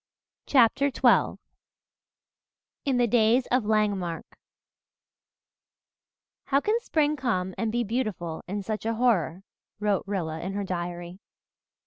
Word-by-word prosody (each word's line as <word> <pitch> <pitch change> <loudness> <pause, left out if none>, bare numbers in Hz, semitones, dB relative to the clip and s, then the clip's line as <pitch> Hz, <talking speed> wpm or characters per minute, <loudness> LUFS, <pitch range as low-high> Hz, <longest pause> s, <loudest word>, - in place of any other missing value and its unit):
CHAPTER 275 +2 +4
XII 265 - +3 1.5
IN 270 -3 +1
THE 245 - +4
DAYS 235 +2 +3
OF 250 -3 +2
LANGEMARCK 205 -6 0 2.2
"How 275 - +3
can 430 +9 +1
spring 305 -9 +1
come 190 -9 -1
and 225 -1 -1
be 240 +1 0
beautiful 210 -8 -3
in 200 +2 -3
such 215 +1 -4
a 230 - 0
horror," 195 -7 +1 0.4
wrote 205 -2 +1
Rilla 165 -5 -3
in 190 +3 -4
her 200 0 -2
diary. 175 -1 -5
215 Hz, 115 wpm, -26 LUFS, 185-245 Hz, 2.2 s, CHAPTER